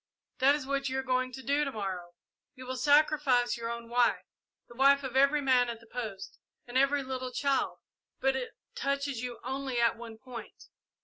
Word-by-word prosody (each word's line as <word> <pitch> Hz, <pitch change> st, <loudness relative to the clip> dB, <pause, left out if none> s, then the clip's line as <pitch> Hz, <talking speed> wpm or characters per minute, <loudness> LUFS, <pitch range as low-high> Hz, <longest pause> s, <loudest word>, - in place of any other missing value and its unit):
"That 275 Hz, +2 st, +5 dB
is 295 Hz, -3 st, -5 dB
what 275 Hz, 0 st, -1 dB
you 260 Hz, -, -2 dB
are 265 Hz, -, -1 dB
going 255 Hz, 0 st, 0 dB
to 265 Hz, -, -8 dB
do 285 Hz, +2 st, +2 dB
to 275 Hz, -, -2 dB
morrow. 185 Hz, -6 st, -5 dB, 0.4 s
You 255 Hz, -1 st, -10 dB
will 255 Hz, +1 st, -4 dB
sacrifice 285 Hz, -3 st, +3 dB
your 230 Hz, 0 st, -4 dB
own 235 Hz, 0 st, -5 dB
wife, 240 Hz, +1 st, +2 dB, 0.4 s
the -, -, -14 dB
wife 275 Hz, +3 st, +4 dB
of 260 Hz, -1 st, -5 dB
every 280 Hz, +2 st, +4 dB
man 255 Hz, -3 st, +3 dB
at 230 Hz, -1 st, -5 dB
the 230 Hz, -, -18 dB
post, 220 Hz, -5 st, -6 dB, 0.3 s
and 245 Hz, -, -11 dB
every 275 Hz, +2 st, +3 dB
little 260 Hz, -1 st, -4 dB
child, 275 Hz, +2 st, 0 dB, 0.4 s
but 270 Hz, 0 st, +2 dB
it 255 Hz, -2 st, -4 dB, 0.2 s
touches 280 Hz, -3 st, -2 dB
you 245 Hz, -2 st, -5 dB
only 265 Hz, 0 st, -2 dB
at 235 Hz, -1 st, +3 dB
one 230 Hz, -1 st, -9 dB
point. 245 Hz, 0 st, -10 dB
260 Hz, 195 wpm, -30 LUFS, 240-275 Hz, 0.4 s, That